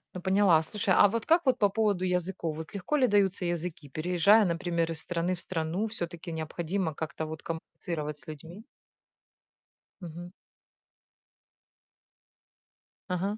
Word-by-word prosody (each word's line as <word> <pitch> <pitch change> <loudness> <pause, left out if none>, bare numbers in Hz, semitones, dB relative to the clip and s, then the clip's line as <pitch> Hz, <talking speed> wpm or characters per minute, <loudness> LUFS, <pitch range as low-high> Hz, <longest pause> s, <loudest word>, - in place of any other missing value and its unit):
Ну 180 - -5
поняла. 190 -3 +4
Слушай, 195 +3 0
а 205 - +7
вот 230 +2 -2
как 330 0 +4
вот 260 - +3
по 205 - +5
поводу 200 -2 +1
языков? 180 -3 -1
Вот 160 0 -8
легко 200 +9 -2
ли 270 -3 +4
даются 200 -4 +2
языки? 170 -3 -3
Переезжая, 180 +8 +4
например, 170 -1 0
из 160 -2 -4
страны 175 +1 -1
в 175 - -9
страну, 170 +4 -2
всё-таки 170 -5 -6
необходимо 165 +2 -2
как-то 160 0 -4
вот 155 0 -7
коммуницировать 160 -2 -5
с - - -14
людьми. 165 +7 -9 1.4
Мгм. 175 0 -8 2.8
Ага. 190 +4 -1
175 Hz, 135 wpm, -29 LUFS, 160-200 Hz, 2.8 s, а